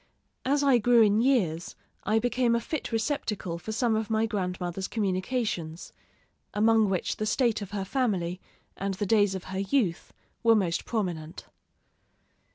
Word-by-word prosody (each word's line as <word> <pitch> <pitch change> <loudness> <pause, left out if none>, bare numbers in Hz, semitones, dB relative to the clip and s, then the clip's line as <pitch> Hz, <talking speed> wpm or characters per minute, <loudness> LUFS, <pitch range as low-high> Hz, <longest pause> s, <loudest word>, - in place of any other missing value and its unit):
As 285 +2 +2
I 270 -4 +5
grew 235 +1 +5
in 210 +1 +3
years, 185 -11 +1 0.3
I 215 +2 +2
became 240 +1 +2
a - - +2
fit 280 +5 -4
receptacle 225 - -2
for 220 - -6
some 225 0 +1
of 220 -1 -2
my 220 0 +2
grandmother's 185 -3 -3
communications, 185 -4 -2 0.6
among 220 0 +4
which 185 -2 -1
the 215 - -2
state 230 0 +1
of 200 - -6
her 200 -2 -3
family 190 -7 -1 0.3
and 195 0 -3
the 205 - -2
days 205 -1 +3
of 185 - -5
her 190 - -2
youth 195 -4 0 0.3
were 230 -1 +5
most 175 -6 0
prominent. 175 -7 -3
210 Hz, 155 wpm, -28 LUFS, 185-235 Hz, 0.6 s, I